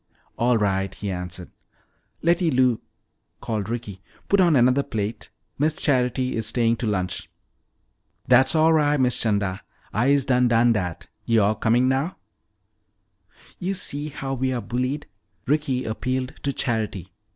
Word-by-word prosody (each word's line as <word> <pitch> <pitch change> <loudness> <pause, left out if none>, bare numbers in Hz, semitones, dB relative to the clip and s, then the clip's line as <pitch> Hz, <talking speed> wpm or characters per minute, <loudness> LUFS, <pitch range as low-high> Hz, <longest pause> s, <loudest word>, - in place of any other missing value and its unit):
"All 120 0 +2
right," 95 -2 0
he 100 -1 -4
answered. 90 0 -6 0.7
"Letty 170 +1 +3
Lou," 125 -4 +2 0.6
called 110 -3 -3
Ricky, 115 -6 -5 0.3
"put 200 - +4
on 170 -4 +4
another 130 +2 +4
plate. 110 -5 -4 0.3
Miss 155 +1 +2
Charity 125 -3 0
is 110 -1 0
staying 115 +1 +1
to 115 - -2
lunch." 95 -3 -2 1.0
"Dat's 135 +5 +5
all 160 +1 +5
ri', 150 -2 +3
Miss 125 -2 +2
'Chanda. 100 -4 -1 0.3
I'se 135 +4 +2
done 125 -1 +3
done 120 0 +4
dat. 90 -6 -3 0.2
Yo'all 110 -2 +3
comin' 115 +4 +2
now?" 135 +7 0 1.4
"You 190 +2 -2
see 145 -4 -3
how 135 -2 -5
we 130 0 -1
are 125 - -1
bullied," 125 +5 -2 0.4
Ricky 135 -2 0
appealed 130 +3 -2
to 140 - -1
Charity. 105 -8 -3
125 Hz, 140 wpm, -24 LUFS, 110-140 Hz, 1.4 s, Dat's